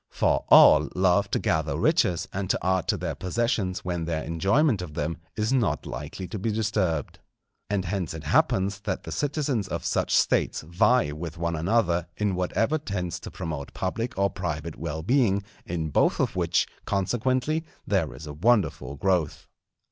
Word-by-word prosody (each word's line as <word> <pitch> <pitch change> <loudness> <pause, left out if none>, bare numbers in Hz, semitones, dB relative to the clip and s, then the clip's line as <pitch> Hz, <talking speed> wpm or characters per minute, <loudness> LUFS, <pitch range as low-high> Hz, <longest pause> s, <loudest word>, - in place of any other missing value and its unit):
For - - +1
all 75 -1 +8
love 95 +2 +3
to - - +1
gather 80 -4 0
riches 85 -2 +2
and 95 -1 -3
to - - +2
add 95 -1 +1
to - - +1
their - - -3
possessions 95 -2 -1
when 85 -2 -2
their 80 -1 -2
enjoyment 100 - +2
of 80 -5 -7
them 80 +1 -2 0.2
is 110 +4 0
not 120 -6 +1
likely 75 +8 -6
to 105 - -5
be 110 +4 -1
disturbed. 105 -7 -1 0.5
And 100 -2 0
hence 90 -3 -3
it 80 - -7
happens 95 +6 +2
that 100 - -3
the - - -7
citizens 140 -8 -1
of - - -4
such - - +1
States - - +1
vie 85 +3 +2
with 80 +2 -6
one 85 0 -1
another 85 0 +1
in 105 -2 0
whatever 110 - 0
tends 90 - -4
to - - -8
promote 75 -4 -6
public 115 +6 -3
or 100 0 +2
private 85 -3 -4
well 80 +2 -5
being; 100 - +2 0.2
in 80 -2 -2
both - - +2
of - - 0
which, 85 -2 +2 0.2
consequently, 130 - 0 0.2
there 95 -8 0
is 75 - -9
a 75 - -7
wonderful 100 -4 +1
growth. 90 -2 0
95 Hz, 170 wpm, -26 LUFS, 80-105 Hz, 0.5 s, all